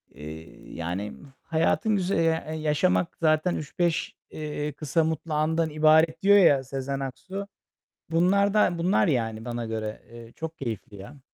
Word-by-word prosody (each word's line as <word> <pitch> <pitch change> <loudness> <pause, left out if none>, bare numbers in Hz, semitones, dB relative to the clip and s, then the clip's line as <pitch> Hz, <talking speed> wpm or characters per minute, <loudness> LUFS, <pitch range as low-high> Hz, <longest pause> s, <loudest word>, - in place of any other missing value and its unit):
Eee, 80 +2 -10
yani 90 +5 -4 0.3
hayatın 165 +6 +1
güz 185 -1 -1
e - - +2 0.3
eee, 155 - -4
"Yaşamak 155 +3 +1
zaten 155 +2 +2
3-5", 165 +2 -1 0.2
eee, 150 -1 -4
"kısa 155 +2 0
mutlu 160 0 -2
andan 160 +2 +1
ibaret" 155 +1 +4
diyor 200 +1 +6
ya 145 -8 +5
Sezen 135 +1 -4
Aksu. 185 +10 -6 0.6
Bunlar 195 +5 +3
da 180 -5 +3
bunlar 185 +4 +2
yani 115 -5 -1
bana 120 -1 -4
göre. 110 -1 -4
Eee, 115 -1 -11
çok 160 0 -6
keyifli 110 -5 -5
ya. 135 +9 -11
155 Hz, 150 wpm, -26 LUFS, 125-170 Hz, 0.6 s, diyor